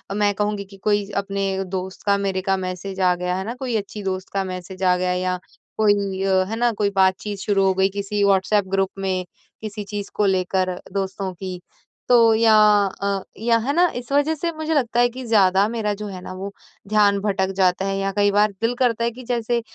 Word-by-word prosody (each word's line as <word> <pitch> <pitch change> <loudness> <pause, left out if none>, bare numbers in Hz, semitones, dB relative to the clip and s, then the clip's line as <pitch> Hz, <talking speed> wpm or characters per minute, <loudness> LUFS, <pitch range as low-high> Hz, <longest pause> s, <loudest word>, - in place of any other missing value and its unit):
मैं 205 0 +2
कहूँगी 210 0 -1
कि 195 0 -15
कोई 205 -1 +1
अपने 195 -1 -1
दोस्त 185 0 -5
का 200 -1 +3
मेरे 195 -1 -1
का 195 +1 +1
मैसेज 190 +1 -5
आ 180 -1 +4
गया 180 0 -2
है 190 - -3
ना? 230 - -3
कोई 255 -2 -3
अच्छी 205 0 -4
दोस्त 190 -1 -3
का 195 -1 0
मैसेज 185 0 -7
आ 180 -1 +4
गया 180 0 0
या 180 0 -1 0.4
कोई 200 -3 +1
अ, 190 -1 +3
है 225 - -2
ना? 240 +1 +2
कोई 205 -2 0
बातचीत 195 +2 +1
शुरू 195 0 +1
हो 190 - +3
गई 190 +1 +2
किसी 200 +1 -2
व्हाट्सऐप 200 +1 +3
ग्रुप 195 -1 +1
में 185 -1 -1 0.4
किसी 215 -1 -5
चीज़ 205 0 -5
को 210 - +2
लेकर 185 -1 +1 0.2
दोस्तों 195 -1 -3
की 185 0 -6 0.5
तो 230 -2 +6
या 220 -1 +5 0.5
अ, 200 -1 -1
या 230 +2 +2
है 280 - +1
ना 350 +3 +4
इस 245 +1 -6
वज़ह 290 +3 +2
से 335 +3 -2
मुझे 315 +1 -2
लगता 240 -5 +1
है 245 0 +4
कि 255 +2 -8
ज़्यादा 200 -3 +4
मेरा 220 -3 -1
जो 210 +1 -6
है 185 -2 -7
ना 185 - -8
वो 195 +2 -6 0.4
ध्यान 205 -1 +3
भटक 195 -2 0
जाता 185 0 +2
है 195 0 -1
या 195 0 -1
कई 205 0 +4
बार 210 +1 +3
दिल 230 +2 +1
करता 235 -2 +1
है 235 - +1
कि 255 +2 -11
जैसे 235 -1 -1
200 Hz, 220 wpm, -22 LUFS, 190-215 Hz, 0.5 s, तो